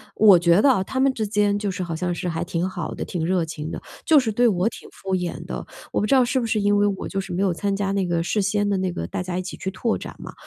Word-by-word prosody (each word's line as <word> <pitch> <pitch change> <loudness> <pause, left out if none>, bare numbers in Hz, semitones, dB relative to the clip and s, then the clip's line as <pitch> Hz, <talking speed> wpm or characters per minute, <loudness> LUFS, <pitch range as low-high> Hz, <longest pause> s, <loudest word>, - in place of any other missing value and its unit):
我 205 -4 +7
觉 170 +3 +4
得 280 - +5
啊， 190 -7 +3
他 260 +6 -4
们 270 0 +3
之 220 -3 -2
间 205 -1 +1
就 205 -2 -2
是 185 0 -5
好 170 -2 -3
像 175 +1 -1
是 180 +1 -4
还 165 0 -2
挺 175 +1 -2
好 175 -4 -5
的、 - - -5
挺 165 -3 -3
热 180 -2 +1
情 155 0 -6
的， - - -6 0.2
就 310 -3 +6
是 240 -4 -1
对 240 +4 +2
我 185 +1 +1
挺 230 - -6
敷 190 -1 -3
衍 170 -2 -4
的。 - - -5 0.3
我 - - +1
不 - - +1
知 245 - +2
道 255 -2 +5
是 260 +1 0
不 - - -2
是 220 -1 0
因 205 0 +2
为 205 - +3
我 195 -2 -3
就 195 -1 -2
是 190 -1 -8
没 180 +2 -1
有 190 -3 +2
参 200 +3 -1
加 195 0 -1
那 195 -2 +1
个 170 -1 0
事 205 +5 0
先 205 +1 +1
的 200 - +1
那 185 -1 -1
个 85 - -4
大 180 - -3
家 180 0 -3
一 - - -1
起 - - -7
去 190 - -4
拓 220 +3 -1
展 - - -8
嘛， - - -8
195 Hz, 345 characters per minute, -23 LUFS, 175-210 Hz, 0.3 s, 我